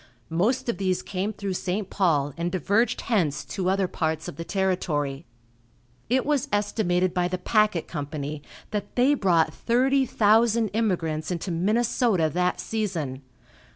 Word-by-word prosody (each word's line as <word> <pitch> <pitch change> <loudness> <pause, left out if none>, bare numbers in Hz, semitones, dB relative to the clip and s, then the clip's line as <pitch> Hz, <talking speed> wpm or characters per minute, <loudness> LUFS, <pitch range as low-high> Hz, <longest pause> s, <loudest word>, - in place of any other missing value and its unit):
Most 235 +11 +1
of 235 - -2
these 185 -2 0
came 195 +2 -2
through 200 -2 -4
St. 185 +2 -2
Paul 150 -7 +1
and 170 +1 -2
diverged 200 +6 +1
hence 180 - 0
to 185 -2 -2
other 190 0 +1
parts 160 -2 -2
of - - -6
the 165 - -5
territory. 165 -7 -1 0.8
It 255 +2 +2
was 290 -3 +1
estimated 190 -3 +1
by 180 -1 +1
the 185 0 -2
packet 210 -2 +1
company 145 -1 -5 0.3
that 210 -2 -4
they 255 +4 +4
brought 170 - +2
thirty 265 +3 +2
thousand 225 +1 +3
immigrants 175 -8 -1
into 180 +1 -3
Minnesota 205 - +1
that 180 +1 0
season. 170 -12 -3
185 Hz, 145 wpm, -25 LUFS, 165-220 Hz, 0.8 s, they